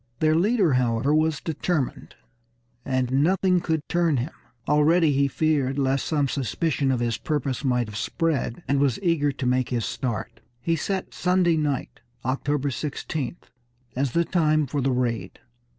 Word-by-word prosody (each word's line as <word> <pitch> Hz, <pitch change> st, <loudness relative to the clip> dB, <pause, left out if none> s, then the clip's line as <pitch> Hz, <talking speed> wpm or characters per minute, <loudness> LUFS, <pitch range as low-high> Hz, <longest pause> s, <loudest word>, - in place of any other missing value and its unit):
Their 155 Hz, 0 st, +3 dB
leader, 190 Hz, -, +3 dB
however, 125 Hz, +2 st, +2 dB
was 155 Hz, -1 st, +2 dB
determined, 155 Hz, -2 st, -2 dB, 0.7 s
and 130 Hz, -1 st, -1 dB
nothing 185 Hz, +1 st, +3 dB
could 160 Hz, -3 st, -2 dB
turn 170 Hz, -4 st, +2 dB
him. 130 Hz, +7 st, -3 dB, 0.3 s
Already 155 Hz, +2 st, +4 dB
he 140 Hz, 0 st, +2 dB
feared 140 Hz, -2 st, 0 dB
lest 135 Hz, -1 st, +1 dB
some 145 Hz, -3 st, +1 dB
suspicion 140 Hz, +2 st, -1 dB
of 125 Hz, -2 st, 0 dB
his 115 Hz, -1 st, -1 dB
purpose 140 Hz, -4 st, -2 dB
might 125 Hz, -3 st, +1 dB
have 105 Hz, -, -9 dB
spread, 160 Hz, +2 st, -1 dB
and 140 Hz, 0 st, +2 dB
was 135 Hz, -4 st, +2 dB
eager 160 Hz, -5 st, +2 dB
to 135 Hz, -, -5 dB
make 125 Hz, 0 st, +1 dB
his 120 Hz, -3 st, -1 dB
start. 120 Hz, -6 st, -4 dB, 0.2 s
He 165 Hz, +7 st, 0 dB
set 190 Hz, +3 st, -3 dB
Sunday 180 Hz, -2 st, +2 dB
night, 150 Hz, -4 st, -2 dB, 0.3 s
October 140 Hz, +2 st, 0 dB
16th, 145 Hz, +2 st, -4 dB, 0.4 s
as 130 Hz, -1 st, -1 dB
the 170 Hz, 0 st, +2 dB
time 155 Hz, -4 st, +2 dB
for 140 Hz, +2 st, -2 dB
the 135 Hz, +1 st, +1 dB
raid. 125 Hz, -3 st, -2 dB
145 Hz, 155 wpm, -25 LUFS, 130-160 Hz, 0.7 s, Already